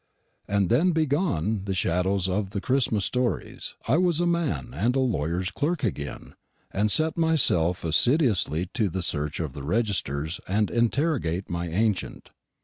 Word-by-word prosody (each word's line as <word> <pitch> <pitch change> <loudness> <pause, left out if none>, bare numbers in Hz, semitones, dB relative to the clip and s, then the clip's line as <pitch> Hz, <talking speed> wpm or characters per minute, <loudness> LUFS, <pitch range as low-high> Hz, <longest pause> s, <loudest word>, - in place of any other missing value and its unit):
And 100 -2 +1
then 165 +10 +3
"being 160 -2 +1
gone" 110 - 0
the 95 -1 -2
shadows 95 +1 +1
of 95 +1 -1
the 100 0 -3
Christmas 115 -4 +1
stories, 125 -1 -2
I - - +3
was 175 -3 +2
a 175 - +2
man 170 -8 -1
and 125 +2 0
a - - +2
lawyer's 90 - -1
clerk 155 - -2
again, 75 - -4 0.4
and 105 +2 +1
set 160 +8 +2
myself 105 - +2
assiduously 95 - +2
to 110 -6 0
search 75 -2 -1
the 70 0 -9
registers 80 - -1
and 105 +2 0
interrogate 120 - 0
my 85 0 -3
ancient. 105 +3 -1
105 Hz, 145 wpm, -26 LUFS, 90-135 Hz, 0.4 s, then